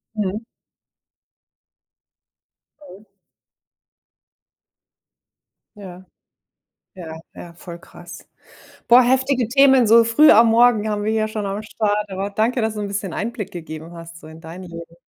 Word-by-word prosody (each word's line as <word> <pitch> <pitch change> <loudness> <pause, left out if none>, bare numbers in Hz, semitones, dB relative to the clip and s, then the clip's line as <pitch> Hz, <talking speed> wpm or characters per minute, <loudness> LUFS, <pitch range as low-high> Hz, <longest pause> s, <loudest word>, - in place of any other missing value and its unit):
Mhm. 205 0 -3 2.5
Mhm. 200 +4 -15 2.7
Ja. 185 -2 -12 0.9
Ja, 160 -3 -10
ja, 170 - -11
voll 170 0 -11
krass. 170 0 -14 0.6
Boah, 245 +1 +6
heftige 260 -2 0
Themen 265 -1 +4
so 230 +2 +5
früh 230 +7 +4
am 230 +2 +6
Morgen 225 -2 +3
haben 205 0 -3
wir 215 - -1
hier 215 -1 -1
schon 215 -1 -5
am 200 +2 -4
Start. 210 -1 -3
Aber 195 +1 -5
danke, 230 +4 -1
dass 220 0 -2
du 210 - -7
'n 205 - -4
bisschen 200 -3 -5
Einblick 220 -2 -5
gegeben 160 -1 -9
hast 165 0 -12
so 155 - -14
in 160 +1 -14
dein 170 +3 -10
Leben. 170 -1 -11
205 Hz, 130 wpm, -20 LUFS, 175-230 Hz, 2.7 s, Boah